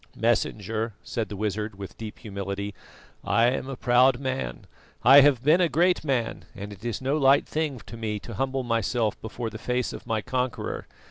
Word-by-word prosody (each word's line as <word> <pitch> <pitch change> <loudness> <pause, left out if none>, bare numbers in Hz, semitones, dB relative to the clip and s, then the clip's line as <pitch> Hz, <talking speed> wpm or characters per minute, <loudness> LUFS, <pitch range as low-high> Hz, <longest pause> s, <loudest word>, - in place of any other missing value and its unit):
"Messenger," 110 +2 0
said 115 -2 -3
the 105 - -5
wizard, 105 +1 -2
with 100 -1 -8
deep 110 -2 -8
humility, 100 -1 -5 0.5
"I 115 0 +3
am 130 +1 -3
a 135 - -4
proud 125 +1 +4
man; 130 -1 -3 0.4
I 135 +4 +9
have 135 -3 +4
been 155 +6 +5
a 175 - +3
great 175 +2 +2
man, 130 -6 -1
and 105 0 -7
it 100 +2 -15
is 120 -1 -3
no 140 +3 +1
light 135 0 +5
thing 150 -5 -2
to - - -9
me 110 -2 -3
to 115 - -8
humble 135 +3 -1
myself 115 -1 0
before 115 +1 -5
the 110 - -8
face 125 0 -1
of - - -9
my 110 -3 -1
conqueror. 125 -1 -2
120 Hz, 190 wpm, -26 LUFS, 110-135 Hz, 0.5 s, I